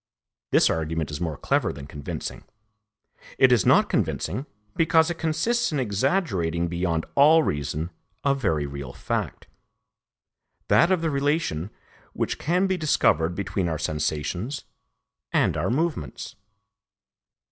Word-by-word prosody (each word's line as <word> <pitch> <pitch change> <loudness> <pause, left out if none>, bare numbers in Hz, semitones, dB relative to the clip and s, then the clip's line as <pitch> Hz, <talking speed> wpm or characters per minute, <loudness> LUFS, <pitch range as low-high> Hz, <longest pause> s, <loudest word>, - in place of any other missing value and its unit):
This - - +5
argument 80 -1 -1
is 75 - -5
more 80 -4 -2
clever - - +1
than 70 0 -9
convincing. 70 0 -6 0.9
It 130 -1 +6
is 120 -6 +4
not - - +5
convincing, 135 +4 -1 0.3
because 160 0 +3
it 170 - -6
consists 225 +10 0
in 150 - -1
exaggerating 100 - 0
beyond 85 -1 -1
all 155 +3 +6
reason 75 - -2 0.3
a 140 - +3
very 80 - 0
real 70 -3 -7
fact, - - -3 1.2
that 170 - +5
of 185 -3 +2
the 165 -1 0
relation 140 - 0 0.4
which - - -2
can 180 +5 +1
be 190 -1 0
discovered 90 - +2
between 95 -2 -2
our 80 - -2
sensations 80 - -2 0.7
and - - +2
our - - -1
movements. 150 - -2
100 Hz, 125 wpm, -25 LUFS, -, 1.2 s, It